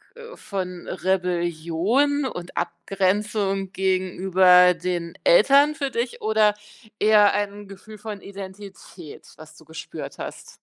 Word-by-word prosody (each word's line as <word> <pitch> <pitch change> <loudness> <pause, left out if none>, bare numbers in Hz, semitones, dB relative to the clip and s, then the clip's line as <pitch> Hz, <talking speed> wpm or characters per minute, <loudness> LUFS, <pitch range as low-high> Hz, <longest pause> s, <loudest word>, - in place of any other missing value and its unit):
äh, 475 +1 -11
von 180 -3 -6
Rebellion 180 - 0
und 175 -8 -7
Abgrenzung 195 0 -1
gegenüber 185 -1 +4
den 175 -2 -4
Eltern 300 - +5
für 280 -3 -3
dich 240 -1 -4
oder 215 -1 +3 0.5
eher 210 -1 +5
ein 205 0 -3
Gefühl 205 +2 -12
von 210 -1 -8
Identität, 195 -4 -11
was 155 0 -14
du 160 - -18
gespürt 160 +1 -9
hast? - - -9
195 Hz, 115 wpm, -23 LUFS, 180-215 Hz, 0.5 s, Eltern